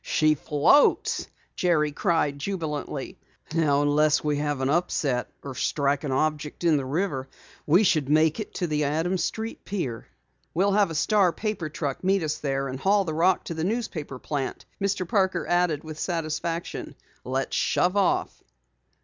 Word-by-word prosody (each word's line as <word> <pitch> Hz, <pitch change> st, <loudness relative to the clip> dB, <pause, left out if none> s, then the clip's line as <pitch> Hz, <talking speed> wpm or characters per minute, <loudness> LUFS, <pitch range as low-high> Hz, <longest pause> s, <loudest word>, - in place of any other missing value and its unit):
"She 155 Hz, 0 st, +3 dB
floats!" 150 Hz, -, +3 dB, 0.3 s
Jerry 155 Hz, -4 st, +2 dB
cried 145 Hz, -2 st, 0 dB
jubilantly. 155 Hz, -3 st, -4 dB, 0.3 s
"Now 145 Hz, -3 st, +3 dB
unless 150 Hz, +1 st, +3 dB
we 150 Hz, -1 st, 0 dB
have 145 Hz, -1 st, -1 dB
an 130 Hz, -, 0 dB
upset 145 Hz, -6 st, 0 dB
or 140 Hz, -, -6 dB
strike 140 Hz, +2 st, 0 dB
an 145 Hz, -, -2 dB
object 150 Hz, +3 st, -1 dB
in 165 Hz, -3 st, +4 dB
the 135 Hz, -, -2 dB
river, 135 Hz, -2 st, -2 dB, 0.4 s
we 175 Hz, +8 st, +5 dB
should 155 Hz, -8 st, +2 dB
make 155 Hz, +4 st, +3 dB
it 215 Hz, -, -5 dB
to 180 Hz, -, -1 dB
the 150 Hz, -2 st, 0 dB
Adams 165 Hz, +5 st, 0 dB
Street 225 Hz, +1 st, -4 dB
pier." 135 Hz, -, -4 dB, 0.5 s
"We'll 195 Hz, +4 st, +3 dB
have 200 Hz, -2 st, +3 dB
a 165 Hz, -, -5 dB
Star 195 Hz, +2 st, +3 dB
paper 210 Hz, -5 st, -3 dB
truck 145 Hz, -2 st, -4 dB
meet 190 Hz, -1 st, +2 dB
us 155 Hz, -1 st, -2 dB
there, 135 Hz, -1 st, -1 dB
and 130 Hz, 0 st, -5 dB
haul 195 Hz, +4 st, +3 dB
the 160 Hz, -, -3 dB
rock 175 Hz, +4 st, +2 dB
to -, -, -5 dB
the 160 Hz, -1 st, -3 dB
newspaper 180 Hz, -, -3 dB
plant," 140 Hz, 0 st, -4 dB, 0.2 s
Mr. 195 Hz, -2 st, 0 dB
Parker 190 Hz, -3 st, +1 dB
added 175 Hz, -4 st, +1 dB
with 155 Hz, -1 st, -8 dB
satisfaction. 165 Hz, 0 st, -3 dB, 0.3 s
"Let's 130 Hz, +1 st, -2 dB
shove 180 Hz, +2 st, +2 dB
off!" 200 Hz, -2 st, +1 dB
155 Hz, 165 wpm, -26 LUFS, 145-180 Hz, 0.5 s, we